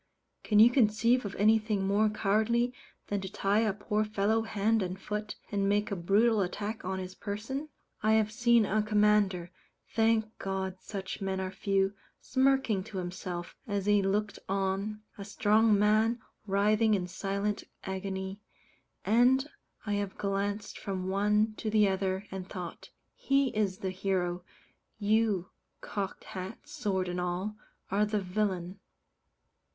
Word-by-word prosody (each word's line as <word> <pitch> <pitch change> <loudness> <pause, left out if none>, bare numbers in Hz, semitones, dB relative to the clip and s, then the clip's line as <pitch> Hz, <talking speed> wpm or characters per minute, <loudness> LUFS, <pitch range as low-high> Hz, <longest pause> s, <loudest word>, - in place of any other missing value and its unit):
Can 210 - +2
you 225 +3 +8
conceive 235 0 +3
of 200 - -5
anything 215 -1 +3
more 205 +2 +3
cowardly 220 +4 +1 0.3
than 205 -1 -2
to 190 0 -6
tie 205 0 +1
a 220 -2 +2
poor 210 +2 -1
fellow 215 +1 +1
hand 220 0 +1
and 185 0 -3
foot, 210 +1 -4 0.2
and 200 -1 +1
make 205 +1 +1
a - - 0
brutal 205 +5 +3
attack 205 +4 -3
on 190 +1 -2
his 185 0 -5
person? 225 +10 -5 0.3
I 215 +1 +3
have 215 -1 +3
seen 235 -1 +4
a 215 +2 +1
commander 210 -4 +2 0.4
thank 225 -1 +2
God 190 -1 -3
such 195 -1 -6
men 190 -1 -1
are 185 0 -3
few: 195 0 +1 0.3
smirking 260 -6 +2
to 215 -3 -7
himself, 175 -1 -5
as 200 -2 -1
he 205 -1 +4
looked 200 +2 -1
on 195 +2 -1 0.2
a - - -4
strong 210 +1 +3
man 215 +3 +3 0.3
writhing 210 +2 +3
in 185 -2 -1
silent 200 +3 -2 0.2
agony, 190 +1 -4 0.6
and 250 +5 +4 0.4
I 205 - -1
have 195 -2 -5
glanced 200 +1 -2
from 190 -2 -3
the 190 - -2
one 210 +2 +2
to 220 - -3
the 210 -1 +4
other 190 0 -1
and 190 -1 -6
thought, 180 -3 -7 0.2
"He 275 0 +2
is 200 -3 0
the 190 -1 -3
hero 180 -2 -1 0.5
you, 210 -3 +1 0.3
cocked 200 -2 -4
hat, 190 +1 -7
sword, 190 -3 -1
and 180 0 -2
all 180 +4 -2 0.4
are 200 +2 +3
the 210 0 0
villain." 185 -1 -2
205 Hz, 150 wpm, -30 LUFS, 190-215 Hz, 0.6 s, you